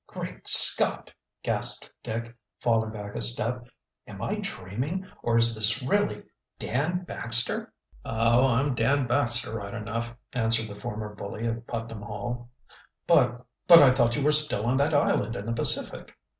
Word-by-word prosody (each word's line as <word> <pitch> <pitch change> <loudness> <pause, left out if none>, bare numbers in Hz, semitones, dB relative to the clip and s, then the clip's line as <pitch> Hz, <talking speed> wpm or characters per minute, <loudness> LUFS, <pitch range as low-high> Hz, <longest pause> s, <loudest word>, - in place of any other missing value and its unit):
"Great - - -9
Scott!" - - +7 0.3
gasped - - -2
Dick, 115 +2 -7 0.2
falling 115 -2 0
back 105 -2 -9
a - - -5
step. 120 +1 +1 0.4
"Am - - -11
I - - -4
dreaming 130 - -6 0.2
or 115 -1 0
is 115 0 +5
this 110 +4 +7
really 205 +11 -1 0.3
Dan 160 +9 -3
Baxter?" 120 -8 -2 0.3
"Oh. 115 +3 +1
I'm 130 +3 0
Dan 135 +4 0
Baxter 120 -2 -2
right 100 0 -7
enough," 115 +1 -6 0.2
answered 115 -2 -1
the - - -9
former 105 0 -8
bully 105 +2 -8
of 115 0 -5
Putnam 115 -2 -7
Hall. 120 +4 -7 0.6
"But 125 -6 +1 0.2
but 170 - +9
I 140 -5 +6
thought 120 -2 0
you 145 - -3
were 150 - +2
still 150 -8 +3
on 125 +2 0
that 145 +2 0
island 125 -4 0
in 100 - -7
the 115 - -4
Pacific." 115 - -2
120 Hz, 155 wpm, -25 LUFS, 110-130 Hz, 0.6 s, but